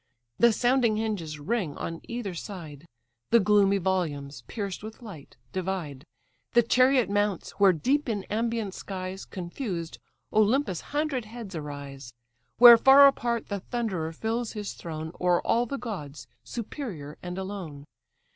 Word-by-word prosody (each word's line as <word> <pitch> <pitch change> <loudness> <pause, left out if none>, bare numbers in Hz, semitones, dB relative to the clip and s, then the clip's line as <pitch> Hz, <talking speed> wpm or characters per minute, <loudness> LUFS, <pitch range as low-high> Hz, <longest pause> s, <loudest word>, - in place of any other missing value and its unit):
The 235 - +6
sounding 240 -1 +2
hinges 200 -9 -3
ring, 175 -1 -2
on 165 0 -5
either 235 -5 -4
side 165 -4 -8 0.4
The 235 - +6
gloomy 200 -1 +4
volumes, 165 -7 -2
pierced 200 -4 -4
with 220 +3 -10
light, 180 -11 -11 0.2
divide. 175 -7 -4 0.5
The 240 - +6
chariot 255 +1 +4
mounts, 205 -2 -1
where 200 -1 +7
deep 260 - 0
in 205 -4 -2
ambient 225 -1 -2
skies, 190 -1 -6
Confused, 175 -2 -5 0.3
Olympus' 215 - +2
hundred 290 -5 -1
heads 220 -3 -9
arise; 140 -5 -7 0.4
Where 240 -1 +10
far 270 +3 +8
apart 240 -4 +1
the 200 -1 -2
Thunderer 190 -7 -3
fills 225 +7 -3
his 210 -2 -5
throne, 160 -1 -6
O'er 180 -1 +3
all 240 +1 +2
the 275 - -3
gods 150 - -6 0.2
superior 185 - -6
and 180 0 -6
alone. 190 -7 -6
200 Hz, 135 wpm, -27 LUFS, 165-235 Hz, 0.5 s, Where